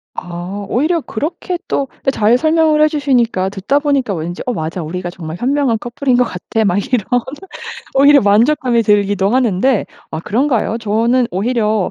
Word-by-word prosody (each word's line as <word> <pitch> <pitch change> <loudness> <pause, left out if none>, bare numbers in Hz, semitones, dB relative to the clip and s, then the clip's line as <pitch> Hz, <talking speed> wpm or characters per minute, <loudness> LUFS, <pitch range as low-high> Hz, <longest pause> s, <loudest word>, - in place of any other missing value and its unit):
아. 180 +4 -6
오히려 315 +7 +1
그렇게 335 +8 -4
또 275 - -1 0.2
때 270 - +2
잘 225 0 +3
설명을 315 0 +2
해주시니까 255 - +1
듣다 205 +9 0
보니까 280 -7 0
왠지 175 +1 -5
'어 250 - -1
맞아. 165 0 -4
우리가 175 +3 -5
정말 165 -2 -7
현명한 265 -1 +1
커플인 245 +2 -1
것 250 - +4
같아.' 220 +1 -2
막 185 -1 +1 0.2
이런 215 -6 +2 0.9
오히려 280 +1 +6
만족감이 235 +4 +3
들기도 205 -2 +2
하는데 245 -1 +1 0.2
아 160 - -4
그런가요? 230 - 0
저는 230 +3 +1
오히려 215 +1 0
230 Hz, 345 characters per minute, -16 LUFS, 195-275 Hz, 0.9 s, 오히려